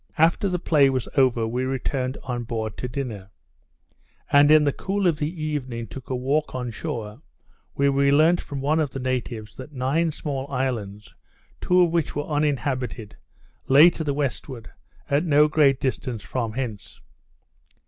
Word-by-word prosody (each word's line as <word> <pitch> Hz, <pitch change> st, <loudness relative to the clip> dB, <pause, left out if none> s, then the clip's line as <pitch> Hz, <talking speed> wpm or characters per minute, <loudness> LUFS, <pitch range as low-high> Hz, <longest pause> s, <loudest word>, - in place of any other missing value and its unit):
After 165 Hz, +5 st, +3 dB
the 180 Hz, -, 0 dB
play 150 Hz, -5 st, +3 dB
was 130 Hz, -2 st, -2 dB
over, 125 Hz, -5 st, +3 dB
we 125 Hz, +3 st, -2 dB
returned 130 Hz, 0 st, -2 dB
on 125 Hz, -2 st, -3 dB
board 110 Hz, -3 st, -4 dB
to 125 Hz, -, -4 dB
dinner; 120 Hz, -7 st, -5 dB, 1.0 s
and 145 Hz, +1 st, +6 dB
in 155 Hz, 0 st, +7 dB
the 145 Hz, -2 st, +1 dB
cool 195 Hz, 0 st, -2 dB
of 170 Hz, -4 st, +3 dB
the 150 Hz, -, -1 dB
evening 145 Hz, -8 st, -4 dB
took 130 Hz, +4 st, -10 dB
a 130 Hz, -, -1 dB
walk 140 Hz, +4 st, -1 dB
on 125 Hz, -2 st, -3 dB
shore, 110 Hz, +2 st, -6 dB, 0.5 s
where 140 Hz, 0 st, +2 dB
we 140 Hz, 0 st, +3 dB
learnt 160 Hz, +5 st, +4 dB
from 140 Hz, -2 st, -6 dB
one 150 Hz, +3 st, +1 dB
of 155 Hz, -3 st, 0 dB
the 135 Hz, -, -6 dB
natives, 120 Hz, -4 st, -3 dB
that 130 Hz, +3 st, -10 dB
nine 145 Hz, +6 st, 0 dB
small 140 Hz, -2 st, -5 dB
islands, 110 Hz, -6 st, -3 dB, 0.5 s
two 180 Hz, 0 st, +3 dB
of 175 Hz, -2 st, +3 dB
which 165 Hz, -3 st, -1 dB
were 145 Hz, 0 st, -2 dB
uninhabited, 135 Hz, -7 st, -2 dB, 0.5 s
lay 150 Hz, +6 st, +7 dB
to 165 Hz, -, -5 dB
the 145 Hz, -2 st, -1 dB
westward, 130 Hz, -4 st, -4 dB, 0.4 s
at 140 Hz, +3 st, +1 dB
no 150 Hz, -2 st, +4 dB
great 145 Hz, -3 st, +3 dB
distance 125 Hz, -4 st, -3 dB
from 115 Hz, +1 st, -3 dB
hence. 115 Hz, -5 st, -6 dB
135 Hz, 170 wpm, -24 LUFS, 125-150 Hz, 1.0 s, in